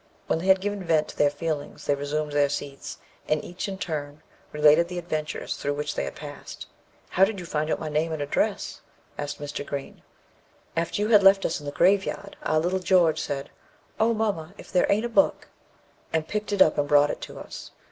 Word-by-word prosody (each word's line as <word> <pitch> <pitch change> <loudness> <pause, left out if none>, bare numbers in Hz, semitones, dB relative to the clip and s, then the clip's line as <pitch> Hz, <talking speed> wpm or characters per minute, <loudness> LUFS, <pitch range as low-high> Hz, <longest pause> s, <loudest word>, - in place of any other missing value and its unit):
When - - 0
they 180 - -4
had 190 0 +5
given 205 -1 -2
vent 160 -3 +2
to - - -9
their 145 - +4
feelings, 145 0 -4
they 145 - +3
resumed 145 +2 -2
their 145 -1 +3
seats, 140 -1 -5 0.3
and 155 -1 0
each 180 +3 -5
in 195 -1 -4
turn 150 -4 -5 0.3
related 150 +3 +5
the 180 0 -6
adventures 155 -3 -3
through 145 0 -2
which 150 +1 -2
they - - -2
had - - -6
passed. 145 -1 -9 0.4
"How 185 - +3
did 200 0 +2
you 180 - -7
find 155 -1 -1
out - - 0
my 155 - -4
name 155 +2 0
and 160 - -3
address?" 145 0 -1 0.4
asked 145 0 -4
Mr. 145 0 -4
Green. 140 -1 -6 0.7
"After 170 +5 0
you 210 - 0
had 210 -3 +7
left 195 0 +6
us - - 0
in 145 - -9
the - - -2
grave 190 +6 +4
yard, 200 0 -6
our 155 - +1
little 175 +4 +1
George 180 -3 +3
said, 140 -1 -4 0.5
'O, 225 +1 +4
mamma, 200 -5 -2
if - - -12
there 180 - +3
aint 210 +3 +2
a - - -2
book!' 285 +5 +2 0.6
and 160 -1 0
picked 210 0 -3
it 200 -2 +7
up 155 - +1
and 145 - +1
brought 145 0 +5
it - - -7
to - - -8
us. - - -9
160 Hz, 220 wpm, -26 LUFS, 145-190 Hz, 0.7 s, had